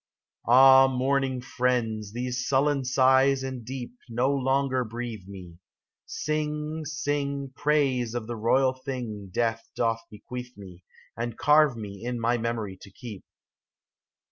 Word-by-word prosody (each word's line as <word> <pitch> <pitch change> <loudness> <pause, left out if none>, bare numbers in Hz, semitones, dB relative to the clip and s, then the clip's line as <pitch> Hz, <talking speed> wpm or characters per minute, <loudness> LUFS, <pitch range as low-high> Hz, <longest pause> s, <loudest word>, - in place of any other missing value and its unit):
Ah, 135 +2 +8
mourning 130 0 0
friends, 120 -4 -1
these 125 +2 -3
sullen 140 0 +2
sighs 130 +1 +4
and 130 -2 -5
deep 125 +1 -6 0.2
No 125 +4 +1
longer 135 -1 +1
breathe 115 -4 -6
me! 90 -4 -11 0.5
Sing, 155 +1 -3
sing 140 -2 -2
Praise 135 -6 +1
of 120 -2 -3
the 120 +1 -5
royal 130 +4 +2
thing 125 -7 -6
Death 115 +2 -1
doth 115 -1 0
bequeath 125 +3 -9
me, 95 -3 -12 0.4
^ - - 0
And 120 -1 -5
carve 150 -3 +4
me 100 -1 -8
in 120 0 -3
my 120 +1 +1
memory 110 -5 -3
to - - -12
keep 105 -1 -9
125 Hz, 135 wpm, -27 LUFS, 115-135 Hz, 0.5 s, Ah